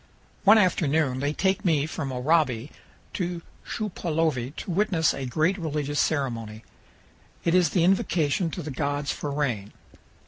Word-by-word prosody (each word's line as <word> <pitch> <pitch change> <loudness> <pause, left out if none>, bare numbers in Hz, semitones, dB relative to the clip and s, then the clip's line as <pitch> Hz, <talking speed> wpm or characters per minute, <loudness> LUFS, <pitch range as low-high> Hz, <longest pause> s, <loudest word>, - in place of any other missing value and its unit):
One 210 +3 +8
afternoon 155 -8 +2
they 145 +2 0
take 190 +4 0
me 155 -5 +2
from 155 -3 -4
Oraibi 130 -1 +1 0.4
to 175 -2 -3 0.2
Shupaulovi 160 - -2
to - - -5
witness 175 -4 +2
a 135 -1 -4
great 160 +10 +1
religious 145 -3 -2
ceremony. 115 -7 -1 0.8
It 170 - +1
is 180 -3 +4
the 175 0 +2
invocation 175 -3 +2
to 175 +2 -6
the 150 - -5
gods 145 +1 -1
for 145 - -4
rain. 125 -9 -2
155 Hz, 140 wpm, -26 LUFS, 140-175 Hz, 0.8 s, One